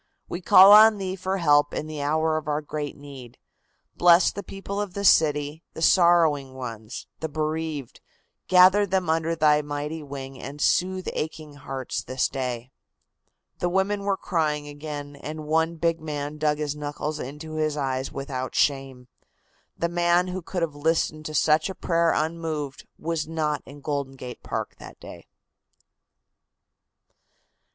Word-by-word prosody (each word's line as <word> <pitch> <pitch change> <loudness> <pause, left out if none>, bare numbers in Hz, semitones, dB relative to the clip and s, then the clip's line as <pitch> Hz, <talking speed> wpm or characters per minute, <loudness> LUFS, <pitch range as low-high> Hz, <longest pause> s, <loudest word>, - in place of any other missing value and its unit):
We 175 - -5
call 190 +2 +8
on 215 +1 +8
Thee 190 -1 -3
for 190 +1 -2
help 145 -4 +3
in - - -3
the 155 -1 -6
hour 155 +2 +1
of 155 -1 -3
our 150 0 0
great 150 -1 -5
need. 135 -4 -11 0.6
Bless 175 0 +5
the 200 - -6
people 195 +1 -5
of 200 -3 -5
this 200 -1 +6
city, 150 0 +1
the - - -7
sorrowing 160 -7 +4
ones, 115 -3 -7
the 160 - -4
bereaved, 155 -2 -4 0.5
gather 185 +3 +6
them 185 -3 0
under 165 +1 0
Thy 150 -2 +4
mighty 150 +2 -5
wing 135 -2 -8
and 145 +2 -8
soothe 185 +4 +1
aching 155 -1 -5
hearts 135 -2 -5
this 130 0 0
day." 125 -2 -4 0.9
The 175 - 0
women 190 +3 0
were 200 -1 0
crying 150 -5 -1
again, 145 -1 -7
and 155 +2 -7
one 160 +2 +1
big 165 0 0
man 150 -1 -5
dug 150 -1 +1
his 150 -1 -3
knuckles 150 +1 -4
into 150 +4 -7
his 155 -1 0
eyes 135 -2 -2
without 130 -2 -5
shame. 135 -3 0 0.7
The 170 - 0
man 175 +1 +2
who 185 +1 -4
could 175 +1 -3
have 160 -3 -2
listened 155 0 -1
to 155 - -6
such 155 +3 +3
a 190 - -6
prayer 170 -1 +1
unmoved 155 -3 -3
was 160 -1 -3
not 155 -2 -1
in 140 +1 -12
Golden 140 -2 -3
Gate 125 -2 -9
Park - - -5
that - - -12
day. - - -12
155 Hz, 155 wpm, -25 LUFS, 145-170 Hz, 0.9 s, call